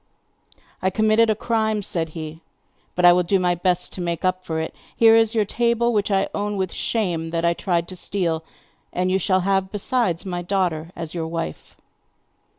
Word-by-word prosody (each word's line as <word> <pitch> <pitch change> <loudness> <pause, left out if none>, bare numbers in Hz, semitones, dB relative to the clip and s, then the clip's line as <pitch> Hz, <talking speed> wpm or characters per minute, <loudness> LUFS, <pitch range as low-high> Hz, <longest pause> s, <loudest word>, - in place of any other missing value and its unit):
'I 190 - +2
committed 220 +3 +3
a 215 - +3
crime,' 220 -2 0
said 165 -3 -2
he; 160 0 -7 0.5
'but 180 - +3
I 175 - +9
will 180 - +3
do 190 +2 +1
my 180 -1 +2
best 180 0 0
to 185 - -5
make 170 0 -2
up 185 0 0
for 160 -3 -3
it. 160 - -4 0.2
Here 225 -1 +7
is 225 0 +3
your 215 -2 +3
table, 235 +2 +1
which 205 -1 +1
I 195 -1 +2
own 205 0 -2
with 190 -2 -2
shame 175 -8 -1
that 165 0 -1
I 170 - +3
tried 170 -1 -1
to 185 - -7
steal, 170 -4 -2 0.5
and 185 +1 0
you 190 - +2
shall 185 +1 +2
have 190 0 0
besides, 205 - 0
my 175 -2 -3
daughter 175 -3 -1
as 165 -1 -6
your 165 -2 -3
wife! 165 - -5
185 Hz, 195 wpm, -22 LUFS, 170-210 Hz, 0.5 s, I